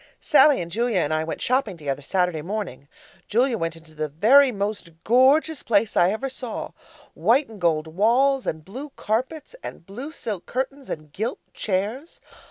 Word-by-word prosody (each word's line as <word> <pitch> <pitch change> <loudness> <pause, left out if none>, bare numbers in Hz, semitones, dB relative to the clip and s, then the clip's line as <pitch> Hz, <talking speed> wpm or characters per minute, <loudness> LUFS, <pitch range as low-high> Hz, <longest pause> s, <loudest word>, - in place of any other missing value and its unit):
Sallie 290 -11 +5
and 170 - -10
Julia 230 +1 0
and 155 0 -1
I 155 0 +1
went 160 - -5
shopping 250 -7 0
together 145 -2 -3
Saturday 180 +1 0
morning. 175 -7 -5 0.4
Julia 245 +3 +2
went 165 -5 -2
into 165 -1 -16
the 155 0 -3
very 250 - +5
most 200 -3 -3
gorgeous 270 +6 +4
place 210 -1 +1
I 175 - +5
ever 220 +7 -2
saw, 255 -3 -6 0.4
white 270 +5 +3
and 215 -4 -12
gold 160 -2 +2
walls 240 +11 +2
and 155 -1 -3
blue 260 +10 -7
carpets 260 - -3
and - - -8
blue 245 - -7
silk 210 - -5
curtains 270 +2 -4
and 155 -2 -6
gilt 220 +7 -2 0.2
chairs. 215 - -3
215 Hz, 170 wpm, -24 LUFS, 165-260 Hz, 0.4 s, Sallie